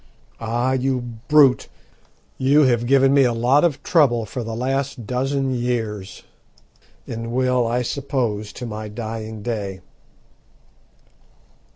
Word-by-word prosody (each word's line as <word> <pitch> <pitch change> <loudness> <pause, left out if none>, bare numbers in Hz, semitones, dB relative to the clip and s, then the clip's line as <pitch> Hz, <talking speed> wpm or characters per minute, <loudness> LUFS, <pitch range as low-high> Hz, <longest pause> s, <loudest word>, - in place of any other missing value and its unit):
"Ah, 120 +3 -1
you 130 0 0 0.3
brute! 145 -4 +5 0.7
you 140 +3 +4
have 120 -3 +2
given 135 +1 +4
me 140 -1 +5
a 125 - +3
lot 125 +6 +3
of 160 -6 0
trouble 125 -9 +3
for 120 +4 -5
the 115 0 -5
last 135 0 -2
dozen 135 +2 -1
years, 115 -5 -3 0.8
and 115 0 -5
will, 125 -1 +1
I 120 +2 0
suppose 120 -6 -2
to 125 - -7
my 110 -1 -6
dying 110 0 -6
day." 100 -5 -4
125 Hz, 120 wpm, -21 LUFS, 115-135 Hz, 0.8 s, brute